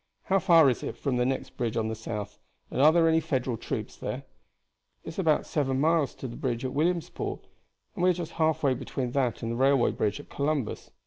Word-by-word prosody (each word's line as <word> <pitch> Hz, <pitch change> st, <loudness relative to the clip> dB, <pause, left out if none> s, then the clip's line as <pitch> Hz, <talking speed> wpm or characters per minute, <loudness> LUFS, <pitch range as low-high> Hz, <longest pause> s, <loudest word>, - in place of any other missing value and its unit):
How 195 Hz, 0 st, +2 dB
far 165 Hz, -4 st, +6 dB
is 125 Hz, -, +1 dB
it -, -, -5 dB
from 135 Hz, -4 st, -1 dB
the 125 Hz, 0 st, +2 dB
next 135 Hz, -, -3 dB
bridge 115 Hz, -2 st, -1 dB
on 110 Hz, -1 st, 0 dB
the 110 Hz, -, -2 dB
south, 105 Hz, -2 st, -6 dB, 0.3 s
and -, -, 0 dB
are 150 Hz, +2 st, +8 dB
there 165 Hz, 0 st, +4 dB
any 160 Hz, 0 st, +4 dB
Federal 130 Hz, -5 st, -1 dB
troops -, -, -5 dB
there?" -, -, -5 dB, 0.8 s
"It -, -, -7 dB
is 160 Hz, -, -7 dB
about 160 Hz, -5 st, +2 dB
seven 135 Hz, -3 st, 0 dB
miles 155 Hz, -1 st, +2 dB
to 130 Hz, -, -6 dB
the 120 Hz, -, -8 dB
bridge 120 Hz, -1 st, -2 dB
at 130 Hz, -, -3 dB
Williamsport, 165 Hz, +3 st, -1 dB, 0.5 s
we 180 Hz, +1 st, +2 dB
are -, -, +4 dB
just 170 Hz, -1 st, -5 dB
halfway 155 Hz, -4 st, +2 dB
between 130 Hz, -1 st, -4 dB
that 125 Hz, -5 st, 0 dB
and 115 Hz, -, -2 dB
the -, -, -2 dB
railway 135 Hz, -1 st, +4 dB
bridge 105 Hz, +5 st, -1 dB
at 145 Hz, -, -11 dB
Columbus. 140 Hz, -5 st, -2 dB
135 Hz, 215 wpm, -28 LUFS, 120-160 Hz, 0.8 s, are